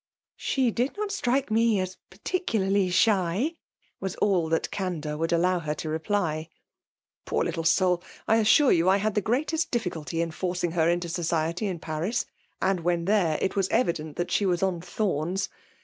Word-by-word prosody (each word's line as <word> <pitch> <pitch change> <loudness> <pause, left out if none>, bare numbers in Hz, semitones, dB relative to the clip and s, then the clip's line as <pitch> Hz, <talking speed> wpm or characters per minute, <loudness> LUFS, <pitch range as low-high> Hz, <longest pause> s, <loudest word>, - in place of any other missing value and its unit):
'' - - -71
She 260 -4 +2
did 250 - -1
not 420 -1 -2
strike 265 - 0
me 225 -1 +3
as 185 0 -3
particularly 200 - 0
shy/' 200 - +2 0.5
^as 190 -1 -3
all 180 -6 +2
that 165 - 0
candour 165 -6 -3
would 165 +2 -1
allow 180 +2 +2
her 155 -2 -3
to 155 - -5
reply. 160 -1 -1 0.4
*' - - -65
Poor - - +1
little 165 - -2
soul! 180 +1 +3 0.3
I 225 - +4
assure 225 +6 +5
you 170 +1 +4
I 195 - +5
had 210 +1 0
the 210 - +1
greateiSt 310 - 0
difficulty 170 - -3
in 165 0 0
forcing 175 0 -2
her 165 -1 +2
into 175 0 0
society 170 +2 -1
in 185 -3 -3
Paris; 165 +9 -2 0.3
and 190 -1 +1
when 170 0 0
there, 185 -6 +2
it 190 - 0
was 195 -2 +1
evident 160 -9 0
that 175 - -3
she - - +2
was 175 0 +1
on 185 -3 0
thorns. 180 -1 -1
185 Hz, 180 wpm, -27 LUFS, 165-215 Hz, 0.5 s, assure